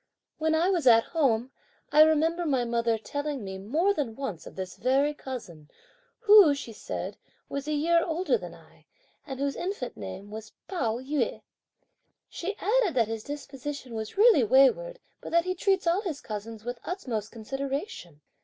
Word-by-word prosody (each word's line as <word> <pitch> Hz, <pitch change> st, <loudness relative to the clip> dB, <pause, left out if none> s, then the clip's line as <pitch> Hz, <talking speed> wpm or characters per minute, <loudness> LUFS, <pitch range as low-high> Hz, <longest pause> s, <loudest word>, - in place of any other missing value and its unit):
"When 315 Hz, 0 st, +2 dB
I 345 Hz, +4 st, +2 dB
was 340 Hz, -8 st, 0 dB
at 230 Hz, -1 st, +7 dB
home, 265 Hz, -6 st, 0 dB, 0.4 s
I 300 Hz, -, +7 dB
remember 315 Hz, +2 st, +4 dB
my 265 Hz, -6 st, +1 dB
mother 235 Hz, -1 st, +1 dB
telling 285 Hz, +2 st, -4 dB
me 190 Hz, -1 st, -6 dB
more 315 Hz, -, +1 dB
than 265 Hz, -, -3 dB
once 210 Hz, -, -5 dB
of -, -, -11 dB
this 185 Hz, -1 st, -6 dB
very 275 Hz, +3 st, +2 dB
cousin, 200 Hz, -, -8 dB, 0.5 s
who 410 Hz, -9 st, +7 dB
(she 240 Hz, -5 st, -7 dB
said) -, -, -5 dB, 0.3 s
was 280 Hz, +1 st, -4 dB
a 305 Hz, -, 0 dB
year 335 Hz, +3 st, +3 dB
older 350 Hz, +7 st, 0 dB
than -, -, -6 dB
I, -, -, -21 dB, 0.4 s
and 265 Hz, -2 st, -6 dB
whose 280 Hz, 0 st, -1 dB
infant 350 Hz, -9 st, -4 dB
name 105 Hz, -, -8 dB
was 220 Hz, 0 st, -8 dB
Pao 235 Hz, -, -1 dB
yü. 275 Hz, +3 st, -2 dB, 0.8 s
She 395 Hz, +4 st, -5 dB
added 425 Hz, -, +1 dB
that 230 Hz, -3 st, +2 dB
his 225 Hz, -1 st, -4 dB
disposition 285 Hz, -2 st, -7 dB
was 220 Hz, -, -5 dB
really 420 Hz, -, +6 dB
wayward, 275 Hz, -, +4 dB, 0.2 s
but -, -, -7 dB
that 340 Hz, 0 st, +4 dB
he 365 Hz, -, 0 dB
treats 385 Hz, +1 st, +1 dB
all 340 Hz, +4 st, +2 dB
his 335 Hz, -9 st, -4 dB
cousins 215 Hz, +1 st, -7 dB
with 245 Hz, 0 st, -4 dB
the -, -, -9 dB
utmost 240 Hz, -, -4 dB
consideration. 270 Hz, -, -5 dB
275 Hz, 175 wpm, -28 LUFS, 225-335 Hz, 0.8 s, at